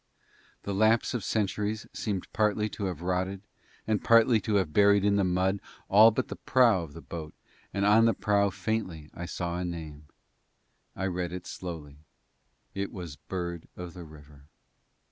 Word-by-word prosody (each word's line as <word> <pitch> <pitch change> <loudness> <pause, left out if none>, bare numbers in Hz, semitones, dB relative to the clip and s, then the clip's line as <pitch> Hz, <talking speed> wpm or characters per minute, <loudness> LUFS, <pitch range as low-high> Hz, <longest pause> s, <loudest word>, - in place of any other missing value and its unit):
The 100 - -3
lapse 110 +5 +3
of 120 -5 -2
centuries 105 0 -1
seemed 100 -4 -3
partly 105 0 +1
to 100 - -5
have 90 -3 -4
rotted 95 +2 -1 0.4
and 110 -2 0
partly 115 -1 +5
to 105 +2 -1
have 90 -6 +1
buried 100 -1 +5
in 100 0 +3
the 100 - +2
mud 95 +2 +1 0.3
all 105 +3 +8
but 110 - -2
the - - -7
prow 120 -7 +4
of 80 -4 -8
the 85 - -10
boat 80 -2 -7 0.4
and 100 +1 0
on 110 +2 +6
the 115 -3 +3
prow 100 0 +2
I - - 0
faintly 95 -8 -3 0.2
saw 90 -1 -3
a - - -2
name. 80 -4 -6 0.9
I 95 - -2
read 90 -2 -2
it 90 0 -6
slowly 80 -6 -7 0.8
it 100 0 -3
was 85 -7 -7
_Bird 85 -3 -4
of 90 -2 -7
the 90 - -9
River. 75 -3 -15
95 Hz, 170 wpm, -28 LUFS, 85-105 Hz, 0.9 s, all